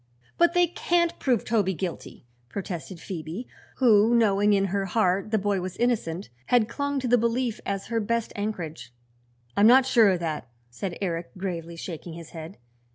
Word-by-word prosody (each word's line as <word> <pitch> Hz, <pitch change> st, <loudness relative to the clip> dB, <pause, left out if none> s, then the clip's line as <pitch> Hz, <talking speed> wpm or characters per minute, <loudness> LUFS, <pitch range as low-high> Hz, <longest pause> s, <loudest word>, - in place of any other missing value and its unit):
"But 345 Hz, +1 st, +3 dB
they 355 Hz, 0 st, +6 dB
can't 340 Hz, 0 st, 0 dB
prove 245 Hz, -5 st, +1 dB
Toby 205 Hz, -5 st, +1 dB
guilty!" 170 Hz, -6 st, -6 dB, 0.2 s
protested 180 Hz, +1 st, -6 dB
Phoebe, 175 Hz, +7 st, -6 dB, 0.3 s
who 230 Hz, -2 st, +5 dB
knowing 210 Hz, -2 st, +4 dB
in 195 Hz, -1 st, +3 dB
her 200 Hz, -1 st, 0 dB
heart 195 Hz, 0 st, +1 dB
the 220 Hz, -, +2 dB
boy 200 Hz, -2 st, 0 dB
was 185 Hz, 0 st, -5 dB
innocent, 205 Hz, -, -1 dB, 0.2 s
had 240 Hz, -3 st, +4 dB
clung 285 Hz, +3 st, -2 dB
to 255 Hz, -, -2 dB
the 245 Hz, 0 st, +4 dB
belief 235 Hz, 0 st, 0 dB
as 195 Hz, -1 st, -2 dB
her 230 Hz, 0 st, -1 dB
best 230 Hz, +1 st, -1 dB
anchorage. 165 Hz, -, -4 dB, 0.6 s
"I'm 205 Hz, -, +6 dB
not 255 Hz, +2 st, +7 dB
sure 230 Hz, -5 st, +5 dB
of 185 Hz, -2 st, +1 dB
that," 155 Hz, -6 st, -3 dB, 0.2 s
said 175 Hz, +8 st, -5 dB
Eric, 170 Hz, +1 st, -3 dB
gravely 170 Hz, -3 st, -4 dB
shaking 165 Hz, 0 st, -7 dB
his 165 Hz, -1 st, -10 dB
head. 165 Hz, +3 st, -8 dB
200 Hz, 170 wpm, -26 LUFS, 175-235 Hz, 0.6 s, not